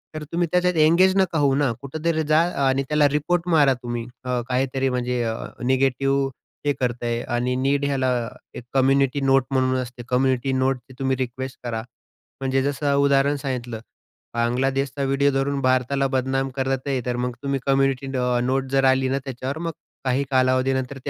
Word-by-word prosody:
तर 155 - -4
तुम्ही 170 +1 0
त्याच्यात 180 0 +2
एंगेज 170 +4 +5
नका 185 -4 +2
होऊ 140 -2 +3
ना. 140 -3 +2
कुठेतरी 155 +3 -1
जा 155 +1 +5 0.3
आणि 135 +1 +1
त्याला 150 -1 +4
रिपोर्ट 165 +5 0
मारा 145 -5 +5
तुम्ही 120 -1 -3 0.2
अ, 125 -1 -1
काहीतरी 135 +1 0
म्हणजे 125 -1 -1
अ, 115 -1 -1 0.3
निगेटिव्ह 135 +1 +1 0.4
हे 145 - +2
करतंय 120 -1 -1 0.2
आणि 125 +1 0
नीड 140 +2 +1
ह्याला 130 -2 +1 0.4
एक - - -7
कम्युनिटी 135 +1 +2
नोट 135 -1 +4
म्हणून 130 -1 +2
असते 125 -1 -8
कम्युनिटी 130 0 +1
नोटची 130 -1 -1
तुम्ही 135 -1 0
रिक्वेस्ट 130 +1 -4
करा. 115 -2 -3 0.6
म्हणजे 135 0 +1
जसं 140 +1 0
उदाहरण 140 0 +3
सांगितलं 125 -4 -4 0.5
बांगलादेशचा 135 +4 0
व्हिडिओ 135 +1 +2
धरून 135 +1 0
भारताला 130 +2 +1
बदनाम 135 0 -1
करत 135 -1 0
आहे. 135 -2 0
तर 125 -1 -1
मग 125 +1 -1
तुम्ही 140 -1 -1
कम्युनिटी 135 -1 +1
अ, 125 -1 +1
नोट 130 +1 0
जर 135 0 +3
आली 130 0 +1
ना 135 +1 0
त्याच्यावर, 130 +2 -4
मग 165 0 -3 0.3
काही 130 +2 +1
कालावधीनंतर 130 +1 +1
ते - - -2
135 Hz, 170 wpm, -23 LUFS, 130-140 Hz, 0.6 s, एंगेज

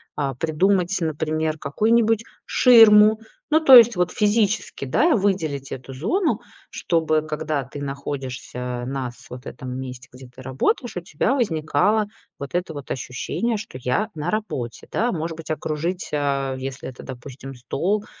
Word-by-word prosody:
а, 135 -3 -2
придумать, 180 +6 +1
например, 155 0 -1
какую-нибудь 225 +7 +2 0.2
ширму. 220 -3 +7 0.3
Ну, 310 +1 +5
то 275 -5 +8
есть 235 -1 +8
вот 180 0 +1
физически, 210 -6 0
да, 305 - +3
выделить 160 -9 -1
эту 135 +1 -7
зону, 235 - 0 0.3
чтобы 160 -2 0
когда 155 -2 -2
ты 140 +3 -9
находишься 130 -3 -5
на 135 -1 -3
с 120 - -18
вот 125 0 -9
этом 130 0 -7
месте, 130 -1 -8
где 130 0 -12
ты 125 +1 -14
работаешь, 135 - -1
у - - -2
тебя 170 - -1
возникало 205 - +1 0.3
вот 140 - -7
это 175 -2 -1
вот 145 -2 -8
ощущение, 140 - -2
что 205 -10 -8
"я 125 - 0
на 155 +2 -3
работе", 135 - -4
да. 240 +3 +1
Может 165 -1 -3
быть, 165 -1 -10
окружить, 160 +4 -3
э, 140 -2 -1
если 135 0 -6
это, 125 - -11
допустим, 135 +1 -9
стол- 185 - -2
155 Hz, 150 wpm, -23 LUFS, 135-210 Hz, 0.3 s, то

